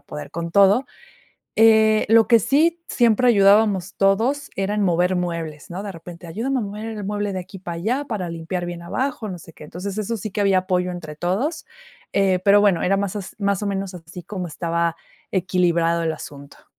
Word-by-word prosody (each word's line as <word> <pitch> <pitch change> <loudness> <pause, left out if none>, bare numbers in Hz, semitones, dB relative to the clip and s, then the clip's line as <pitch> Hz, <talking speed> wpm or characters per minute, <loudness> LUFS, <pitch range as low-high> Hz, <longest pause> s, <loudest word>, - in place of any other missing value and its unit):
poder 75 0 -8
con 170 0 -5
todo. 200 +7 +5 0.7
Eh, 220 -1 +5
lo 225 -1 +6
que 230 -2 +6
sí, 330 - +2
siempre 240 0 +3
ayudábamos 200 -3 +4
todos 230 +9 +1
era 195 +1 -1
en 210 - 0
mover 180 0 +2
muebles, 165 -4 -4
¿no?, 185 +3 -5
de 205 - -5
repente, 170 0 -11
ayúdame 230 +11 -2
a 245 - 0
mover 210 +1 -6
el 215 -2 -5
mueble 205 0 -2
de 190 - -3
aquí 185 +1 -11
para 175 -2 -6
allá, 240 +12 -1
para 205 -9 -4
limpiar 175 +2 -4
bien 175 -1 -6
abajo, 245 +4 -3
no 180 - -6
sé 165 -1 -14
qué. - - -13
Entonces, 185 +7 -6
eso 225 +2 -2
sí 210 +1 -6
que 210 - -2
había 195 -2 +3
apoyo 180 -1 -1
entre 155 -4 -8
todos, 220 - -2 0.5
eh, 190 -2 +2
pero 205 0 +6
bueno, 195 -5 +3
era 195 +2 +2
más 200 0 -2
s 200 -2 -6 0.3
o 205 - -1
menos 195 -1 -3
así 175 +1 -10
como 185 0 -5
estaba 170 +1 -1 0.4
equilibrado 170 -3 +1
el 160 -1 0
asunto. 140 -2 -11
195 Hz, 195 wpm, -22 LUFS, 175-215 Hz, 0.7 s, lo